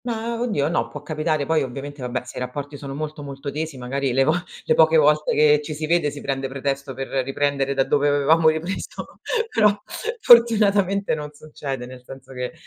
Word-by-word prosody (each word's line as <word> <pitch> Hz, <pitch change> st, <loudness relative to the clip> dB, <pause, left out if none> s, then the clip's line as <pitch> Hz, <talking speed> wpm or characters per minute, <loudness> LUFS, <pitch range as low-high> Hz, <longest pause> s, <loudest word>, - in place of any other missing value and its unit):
Ma, 230 Hz, -1 st, -3 dB
oddio 210 Hz, -13 st, 0 dB
no, 170 Hz, -, 0 dB
può 145 Hz, -, -9 dB
capitare, 155 Hz, -1 st, -1 dB
poi 160 Hz, +1 st, +2 dB
ovviamente, 140 Hz, +2 st, -6 dB
vabbè, 125 Hz, 0 st, -3 dB
se 125 Hz, -, -10 dB
i -, -, -2 dB
rapporti 140 Hz, +3 st, -5 dB
sono 140 Hz, -1 st, -7 dB
molto, 150 Hz, 0 st, -5 dB
molto 140 Hz, 0 st, -6 dB
tesi 155 Hz, 0 st, -4 dB
magari 130 Hz, +1 st, -2 dB
le 135 Hz, +2 st, +4 dB
vo 155 Hz, +4 st, +3 dB, 0.3 s
le -, -, +3 dB
poche 160 Hz, 0 st, +5 dB
volte 150 Hz, 0 st, +3 dB
che 150 Hz, 0 st, +5 dB
ci 155 Hz, 0 st, -5 dB
si 155 Hz, +1 st, -3 dB
vede, 165 Hz, -1 st, +2 dB
si 145 Hz, 0 st, -8 dB
prende 135 Hz, -1 st, -2 dB
pretesto 140 Hz, 0 st, -3 dB
per 135 Hz, +1 st, -5 dB, 0.2 s
riprendere 140 Hz, 0 st, -1 dB
da 135 Hz, -, +3 dB
dove 145 Hz, +2 st, +1 dB
avevamo 155 Hz, +3 st, +4 dB
ripreso, 160 Hz, +5 st, -5 dB, 0.4 s
però 215 Hz, -2 st, +6 dB, 0.5 s
fortunatamente 205 Hz, -, +5 dB
non 150 Hz, -1 st, -4 dB
succede, 145 Hz, -4 st, -6 dB
nel 125 Hz, 0 st, -11 dB
senso 135 Hz, +1 st, -12 dB
che, 125 Hz, -1 st, -4 dB
145 Hz, 195 wpm, -22 LUFS, 135-160 Hz, 0.5 s, però